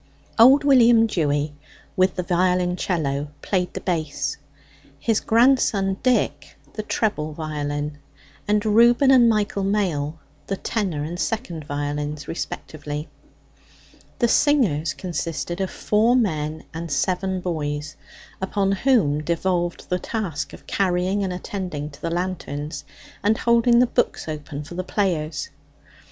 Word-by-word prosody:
Old 265 +5 +8
William 240 -5 +6
Dewy, 150 -7 0 0.4
with 185 0 +2
the 180 - -2
violoncello, 180 -5 0 0.2
played 180 -2 0
the - - -4
bass; 160 -5 -2 0.6
his 215 +10 +1
grandson 225 -5 +3
Dick 255 -1 0 0.2
the 215 - -3
treble 205 -8 -1
violin; 150 -1 -4 0.5
and 210 +1 +2
Reuben 235 +5 +5
and 245 -3 +6
Michael 210 -2 0
Mail 175 -7 0 0.3
the 195 - -2
tenor 185 -11 -2
and 170 +3 -5
second 185 - -3
violins 145 +1 -3
respectively. 150 -2 -5 1.1
The 240 - +3
singers 200 - +2
consisted 175 0 -4
of 190 - -1
four 220 +4 +2
men 155 -9 0
and 165 0 -5
seven 185 +4 0
boys, 150 -4 -3 0.5
upon 195 +1 0
whom 195 - +2
devolved 175 +2 -1
the 180 - -1
task 195 -7 -3
of - - -13
carrying 190 +1 0
and 190 - -2
attending 180 -5 -5
to 140 - -15
the 165 - -2
lanterns, 155 -5 -4 0.4
and 210 +2 +2
holding 235 0 +4
the 250 - +6
books 240 - -1
open 150 -1 -5
for 145 - -10
the 185 +1 -3
players. 165 -7 -1
180 Hz, 125 wpm, -23 LUFS, 150-210 Hz, 1.1 s, Old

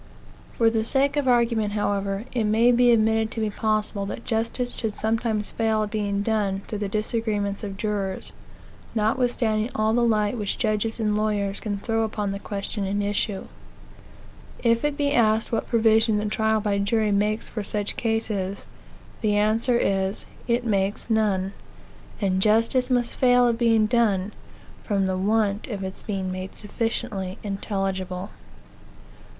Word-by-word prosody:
For 225 -1 +4
the 220 -1 +1
sake 275 +4 +2
of 290 -2 0
the 255 - +4
argument, 230 -3 +2
however, 200 0 -1
it 235 -3 0
may 225 +3 +4
be 245 0 +4
admitted 220 -1 +3
to - - -4
be 215 -1 0
possible 215 -1 -1
that 230 - -6
justice 230 +2 -1
should 220 -3 -3
sometimes 220 -1 -1
fail 220 -1 +1
of 210 - -5
being 205 -2 -1
done 205 -3 0
through 210 - -4
the 205 -1 -2
disagreements 210 -1 -1
of 195 -2 -5
jurors, 200 -2 -3 0.6
notwithstanding 220 0 +1
all 215 0 +2
the 240 - +2
light 220 0 +1
which 205 -2 -2
judges 220 0 -1
and 210 -2 +1
lawyers 205 -2 0
can 205 -2 -3
throw 225 +2 -1
upon 210 -2 -2
the 200 - -4
question 200 +1 -3
in 200 +1 -1
issue. 205 0 -1 1.2
If 230 -1 +3
it 295 -1 0
be 285 -1 +1
asked 220 -3 +2
what 225 - -1
provision 225 -1 +3
the 210 - -1
trial 220 +1 +1
by 205 -1 0
jury 210 +1 +1
makes 210 +2 0
for 215 - -4
such 205 0 -2
cases, 215 -4 -2 0.6
the 210 -2 +2
answer 220 +4 +2
is, 195 -2 0 0.2
it 240 0 +1
makes 200 +1 -1
none; 200 -3 +1 0.7
and 190 -2 +1
justice 230 +5 +3
must 245 -2 +1
fail 245 -1 +4
of 235 -1 0
being 225 -2 +4
done, 210 -4 +1 0.5
from 200 -3 0
the 190 0 0
want 205 +1 +1
of 205 -5 -4
its 190 0 -6
being 190 -3 -3
made 185 +1 -6
sufficiently 205 -3 -3
intelligible. 195 -2 -3
215 Hz, 160 wpm, -24 LUFS, 200-225 Hz, 1.2 s, For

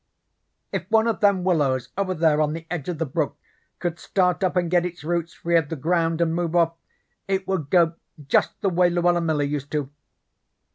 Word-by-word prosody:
If - - -4
one 220 0 +4
of 230 - 0
them 200 -3 +3
willows 145 -8 +1
over 185 -1 -1
there 155 -2 +3
on 150 0 +1
the 165 0 -7
edge 175 -3 -3
of 175 - -3
the 165 - -1
brook 130 - -2 0.4
could 175 -1 -3
start 180 0 +1
up 185 -1 +1
and 175 -2 0
get 175 -1 +3
its 175 -3 -6
roots 170 +1 -2
free 170 0 -1
of 155 -3 0
the 165 - -3
ground, 165 +2 0
and 165 -1 +2
move 170 0 -1
off, 165 -1 +3 0.5
it 190 -1 -1
would 175 -7 -2
go 170 -1 +4 0.3
just - - +1
the 195 - +2
way 175 0 +3
Luella 175 0 +2
Miller 155 -3 0
used 145 -1 -3
to. 145 -2 -2
170 Hz, 205 wpm, -24 LUFS, 160-180 Hz, 0.5 s, one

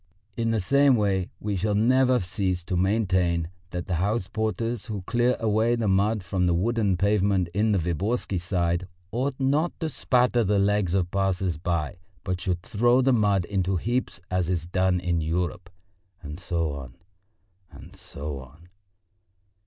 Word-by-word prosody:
In 115 -1 -1
the 115 -1 +1
same 140 +7 +4
way 95 -4 0
we 105 -1 -2
shall 100 +3 0
never 130 +3 +4
cease 90 0 -2
to 90 - -3
maintain 90 -4 +1 0.2
that 90 -2 -4
the 95 - -3
house 100 0 0
porters 110 +1 -2
who 105 -4 -5
clear 120 +5 +1
away 110 +2 +2
the 115 -2 -1
mud 100 +2 +2
from 90 0 0
the 85 - +2
wooden 105 0 +1
pavement 100 -2 +2
in 105 +3 +2
the 100 - +3
Viborgsky 95 +4 -1
Side 85 -1 -1 0.2
ought 130 +4 -1
not 145 +6 +1
to 160 -3 -2
spatter 125 -4 +2
the 105 0 +1
legs 100 -2 +2
of 90 -2 0
passers 95 -2 0
by, 85 +1 -2 0.2
but 90 -1 -3
should 90 -1 -2
throw 120 +2 +3
the 130 0 +3
mud 100 -5 +2
up - - -17
into 95 -1 0
heaps 120 +3 -2
as 90 -2 0
is 85 -3 -1
done 90 +1 +1
in 85 -2 -1
Europe," 90 +2 -2 0.5
and 75 +2 -7
so 85 -5 -1
on, 65 -4 -8 0.7
and - - -14
so 70 -1 -7
on. 75 +7 -15
95 Hz, 170 wpm, -25 LUFS, 90-110 Hz, 0.7 s, same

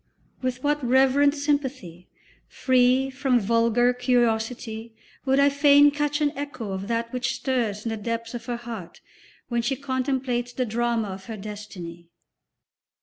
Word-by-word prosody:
With 255 0 -3
what 295 0 0
reverent 270 +3 +4
sympathy, 265 - -2 0.4
free 255 +1 +2
from 260 -2 +1
vulgar 230 +3 +2
curiosity, 230 -2 -1 0.3
would 270 0 +3
I 280 0 +6
fain 285 0 +6
catch 295 +1 -1
an 290 -1 +2
echo 280 -7 -5
of 190 +1 -4
that 230 +1 -2
which 255 +1 -1
stirs 230 -6 -2
in - - -1
the 225 - -3
depths 230 +2 -4
of 235 0 -7
her 240 -1 -2
heart 230 -7 -8 0.5
when 235 -1 0
she 270 +4 -1
contemplates 260 -2 -2
the 255 - -1
drama 235 -1 -1
of 190 0 -8
her 225 -2 -6
destiny. 195 -5 -8
245 Hz, 145 wpm, -25 LUFS, 225-270 Hz, 0.5 s, I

